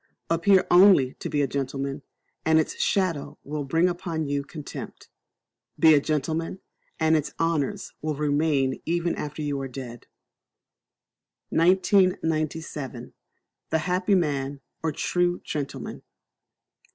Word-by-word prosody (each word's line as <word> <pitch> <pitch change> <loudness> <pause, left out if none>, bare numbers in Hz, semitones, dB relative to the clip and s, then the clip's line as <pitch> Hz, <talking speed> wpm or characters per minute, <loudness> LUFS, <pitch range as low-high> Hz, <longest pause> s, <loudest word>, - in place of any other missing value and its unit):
Appear 185 +3 +4
only 175 -8 +6
to - - -4
be 145 -1 +1
a - - +1
gentleman, 140 +1 -3 0.4
and 160 0 +4
its 160 - 0
shadow 185 -7 0
will 150 +1 -4
bring 165 +6 +2
upon 170 -3 -3
you 140 0 -1
contempt; 150 0 -9 0.7
be 160 -1 +7
a 145 - +6
gentleman, 160 +4 -2 0.4
and 160 0 +4
its 155 -2 -1
honours 165 -4 -1
will 155 -1 -2
remain 145 -2 +1
even 170 +1 0
after 150 +1 -5
you 145 -2 -2
are 135 - -3
dead. 125 -2 -9 1.4
1997. 160 - +1 0.6
The - - +2
Happy 180 +4 +1
Man, 140 -5 -1 0.2
or 160 - 0
True 175 +3 0
Gentleman. 145 -3 -5
155 Hz, 120 wpm, -25 LUFS, 140-170 Hz, 1.4 s, be